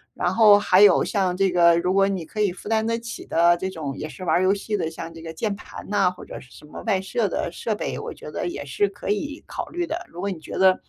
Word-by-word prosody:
然 180 +1 0
后 210 -3 +7
还 190 -1 +4
有 205 - +7
像 185 -3 0
这 195 0 +2
个 170 -1 +5
如 180 +1 0
果 195 +1 +4
你 190 -4 -2
可 210 +7 -8
以 205 -3 +2
负 185 +4 -9
担 220 0 +1
得 230 0 0
起 230 0 -8
的， 170 +1 +3
这 190 - -3
种 150 -6 -5
也 155 - -5
是 185 - -10
玩 - - +2
儿 185 - +1
游 190 - +4
戏 205 +1 -3
的， 160 - -2
像 165 0 -7
这 165 - -11
个 165 0 -7
键 200 +4 -2
盘 - - -11
呐， 200 -3 +2
或 180 - -12
者 - - -8
是 125 - -17
什 - - -14
么 150 - -10
外 200 -5 +1
设 210 +3 -1
的 175 - -2
设 215 +5 -3
备， - - -4
我 - - -6
觉 - - -10
得 175 - -3
也 175 - -5
是 145 +9 0
可 195 - -8
以 285 +9 -2
考 - - -5
虑 345 0 -3
的。 345 +3 -4
如 175 - -11
果 200 - -1
你 180 - -5
觉 155 - -10
得， 190 0 +6
190 Hz, 315 characters per minute, -23 LUFS, 175-210 Hz, -, 后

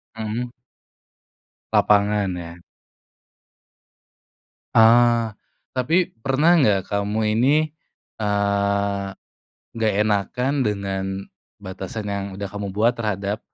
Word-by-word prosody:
Mhm. 110 +2 -4 1.2
Lapangan, 105 -1 +3
ya? 85 0 -9 2.2
Ah! 115 -1 +5 0.4
Tapi, 160 +8 +2 0.2
pernah 150 +6 +4
nggak 105 - +3
kamu 105 +1 0
ini, 130 +6 +4 0.6
eee, 100 -1 0 0.7
nggak 110 -2 0
enakan 110 +5 0
dengan 100 -4 -1 0.5
batasan 95 +2 -7
yang 100 -1 -2
udah 100 - -5
kamu 100 -1 -4
buat 110 +5 +2
terhadap, 105 -1 -2
105 Hz, 85 wpm, -22 LUFS, 100-115 Hz, 2.2 s, Ah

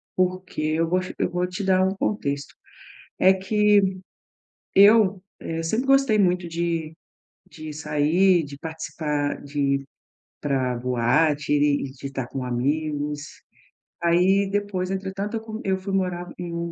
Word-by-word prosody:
porque 185 -1 -1
eu 160 +2 +1
gos 185 +2 -1
eu - - +1
vou 180 0 -1
te 180 +2 -5
dar 185 -1 +3
um 190 - -1
contexto. 140 -9 -2 0.6
É 190 +1 +6
que 200 0 +2 0.8
eu, 200 -1 +6 0.2
eh, 165 0 -4
sempre 225 +10 -1
gostei 270 -5 +4
muito 180 -2 +1
de 165 -1 -2 0.6
de 155 -3 -8
sair, 155 +4 +2
de 140 0 -9
participar 150 -2 -3
de 145 +1 -6
ir 140 0 +1 0.6
para 130 -3 0
boate 125 +5 +1
e 145 -1 +2
de 135 0 -9
estar 135 -2 -4
com 130 0 -5
amigos. 145 +4 -2 0.8
Aí 185 +4 +3
depois, 195 -2 -2
entretanto, 195 +3 -3
eu - - -6
co 220 0 -7
eu 190 -1 +2
fui 190 +1 -6
morar 180 -2 -1
em 175 -1 -5
um 170 0 -3
170 Hz, 145 wpm, -24 LUFS, 145-190 Hz, 0.8 s, É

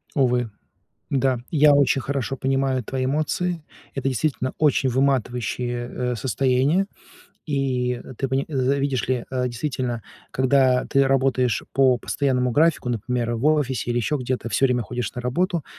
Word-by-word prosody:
Увы. 125 -3 +2 0.6
Да, 130 -2 +1
я 150 -2 +5
очень 140 -1 +3
хорошо 135 -1 -2
понимаю 135 -2 0
твои 130 +1 -2
эмоции. 155 +4 -1 0.3
Это 135 0 -1
действительно 130 0 -1
очень 145 -3 +2
выматывающее, 125 -2 -1
э, 125 0 -2
состояние. 135 - +1 0.6
И, 130 -4 -1
э, 130 - -10
ты 135 - -1
пони 135 +2 0
за 135 -2 +1
видишь 135 -3 -1
ли, 125 -2 0
э, 130 -1 -1
действительно, 125 -2 -3 0.3
когда 130 -1 +3
ты 135 -1 +3
работаешь 130 -3 +1
по 130 -2 +4
постоянному 125 -1 0
графику, 155 0 +2
например, 120 +1 -2
в 115 - -4
офисе 135 -6 +1
или 120 - 0
ещё 120 +6 0
где-то, 125 -2 -3
всё 135 +6 +3
время 125 -2 0
ходишь 120 +1 -4
на 125 - -4
работу, 170 +5 -1
130 Hz, 150 wpm, -23 LUFS, 125-140 Hz, 0.6 s, я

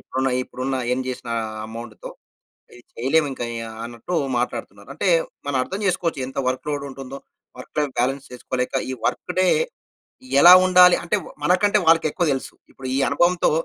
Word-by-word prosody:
ఇప్పుడున్న, 130 +1 -2
ఇప్పుడున్న 130 +1 -4
ఎర్న్ 130 +1 -1
చేసిన 125 -2 -6 0.4
అమౌంట్‌తో. 115 0 -9 0.6
ఇది 120 - -15
చేయలేము 145 +6 +2
ఇంకా 125 - -5 0.2
ఆహ్, 110 0 -10
అన్నట్టు 120 +9 -6 0.2
మాట్లాడుతున్నారు. 120 - -5
అంటే - - -1 0.4
మనం 145 -1 -1
అర్థం 190 +9 -5
చేసుకోవచ్చు 170 -5 -1
ఎంత 135 - -8
వర్క్‌లోడ్ 140 +2 -3
ఉంటుందో 135 0 -8 0.4
వర్క్ - - -12
లైఫ్ 145 -3 0
బ్యాలన్స్ 135 +2 0
చేసుకోలేక 125 +1 -4 0.2
ఈ - - -2
వర్క్‌ - - -2
డే 185 - +4 0.9
ఎలా 175 +4 +10
ఉండాలి 180 -1 +7
అంటే, 170 - 0 0.3
మనకంటే 185 +6 +3
వాళ్ళకెక్కువ 165 +1 +3
తెలుసు. 135 - -5 0.2
ఇప్పుడు 130 - -10
ఈ - - +1
అనుభవంతో 175 +5 +2
135 Hz, 150 wpm, -22 LUFS, 125-170 Hz, 0.9 s, ఎలా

